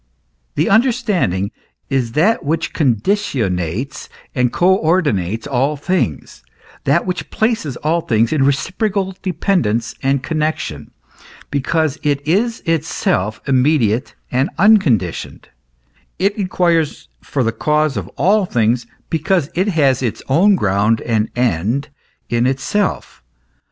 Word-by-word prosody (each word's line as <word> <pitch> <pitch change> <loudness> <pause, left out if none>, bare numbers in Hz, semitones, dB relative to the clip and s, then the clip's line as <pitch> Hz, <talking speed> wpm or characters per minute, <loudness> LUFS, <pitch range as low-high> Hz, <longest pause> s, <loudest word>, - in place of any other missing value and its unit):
The - - +1
understanding 210 - +1 0.4
is 130 -4 -1
that 195 +10 +2
which 160 +3 -1
conditionates 120 - -1 0.2
and 125 -2 +1
co 185 +2 +3
ordinates 115 - 0
all 140 +2 0
things, 145 - -2 0.4
that 145 +6 +2
which 180 -1 -3
places 220 - -1
all 165 +3 0
things 115 -3 +1
in 145 -3 +2
reciprocal 190 - 0
dependence 175 - 0
and 135 0 +1
connexion, 155 -1 -2 0.6
because 150 +1 0
it 145 -1 -1
is 225 +8 +1
itself 150 - -1
immediate 130 -3 +2 0.2
and 130 +3 +1
unconditioned; 165 - +2 0.7
it 200 +2 +1
inquires 175 -5 0
for 135 - -2
the 115 - +1
cause 150 +5 +1
of - - -4
all 195 +4 +3
things, 120 -1 +1 0.2
because 165 -1 0
it 185 +4 0
has 140 - +2
its 120 -4 -3
own 185 +9 +4
ground 105 - +1
and 110 -2 0
end 120 - 0 0.4
in 120 +1 +1
itself. 135 - -2
145 Hz, 115 wpm, -18 LUFS, 120-180 Hz, 0.7 s, own